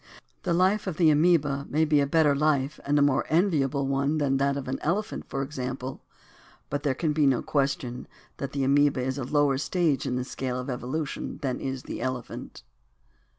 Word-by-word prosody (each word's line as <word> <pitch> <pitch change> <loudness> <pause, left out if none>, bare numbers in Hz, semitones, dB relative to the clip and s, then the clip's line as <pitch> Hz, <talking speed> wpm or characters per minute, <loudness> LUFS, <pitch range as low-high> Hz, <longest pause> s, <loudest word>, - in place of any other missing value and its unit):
The 175 - 0
life 190 +4 +2
of 175 -5 -3
the 165 -3 +5
amoeba 150 -3 +2
may 155 +2 +2
be 150 -1 +3
a 140 - +1
better 150 -1 +3
life 145 -1 +1
and 145 +1 +3
a 145 - +5
more 140 -2 +3
enviable 150 -5 +2
one 140 +3 0
than 140 -2 +1
that 140 +1 +1
of 140 - -4
the 130 - -3
elephant, 200 +7 -2
for 135 - -2
example, 130 -2 -5 0.7
but 145 - -1
there 140 -3 0
can 155 +2 0
be 150 -2 +3
no 130 -2 +2
question 135 -3 -1 0.3
that 140 - -4
the 140 -1 -1
amoeba 140 0 +3
is 130 +2 -2
a - - -2
lower 140 0 +2
stage 160 -3 0
in 125 - -1
the 125 - -1
scale 130 -1 -3
of 125 +1 -4
evolution 130 +5 -4
than 130 -2 -1
is 130 -1 -4
the - - -6
elephant. 125 - -5
140 Hz, 195 wpm, -27 LUFS, 130-155 Hz, 0.7 s, the